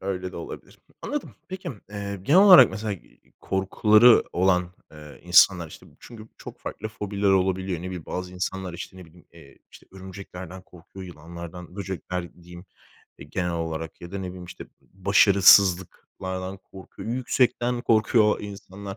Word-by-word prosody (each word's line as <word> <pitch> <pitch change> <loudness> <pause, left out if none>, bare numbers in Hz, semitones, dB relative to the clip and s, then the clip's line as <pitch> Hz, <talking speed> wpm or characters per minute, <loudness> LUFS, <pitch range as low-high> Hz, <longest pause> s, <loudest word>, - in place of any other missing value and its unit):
öyle 95 -1 -4
de - - -9
olabilir. 85 - -10 0.2
Anladım. 295 -1 -5
Peki, 185 -1 -7 0.2
eee, 100 -1 -5
genel 155 - +5
olarak 195 -3 +9
mesela 110 -1 -4
i 95 - -14
korkuları 105 +4 +4
olan, 90 -1 +1 0.2
eee, 75 -1 -13
insanlar, 90 -1 +4
işte, - - -14
çünkü 110 -2 -13
çok - - -11
farklı 110 - -6
fobiler 105 -1 -3
olabiliyor. 95 -1 0
Ne - - -9
bileyim, 90 -3 -7
bazı 90 0 -5
insanlar, 95 0 -4
işte, 90 - -9
ne 95 - -11
bileyim, 85 +1 -20
eee, 70 -5 -17
işte, - - -17
örümceklerden 95 -1 -10
korkuyor, 90 +2 -13
yılanlardan, 85 +2 -10
böcekler 90 -2 -6
diyeyim, 90 +1 -12 0.5
eee, 70 - -11
genel 90 -2 -2
olarak 80 -1 -5
ya 85 +2 -11
da, 100 - -4
ne 95 - -5
bileyim, 90 0 -9
işte, 90 +1 -10
b - - -34 0.2
başarısızlıklardan 95 -1 +3
korkuyor. 95 +3 -12
Yüksekten 125 -1 0
korkuyor 110 0 +3
o - - -11
insanlar. 100 -1 -9
95 Hz, 155 wpm, -24 LUFS, 90-100 Hz, 0.5 s, olarak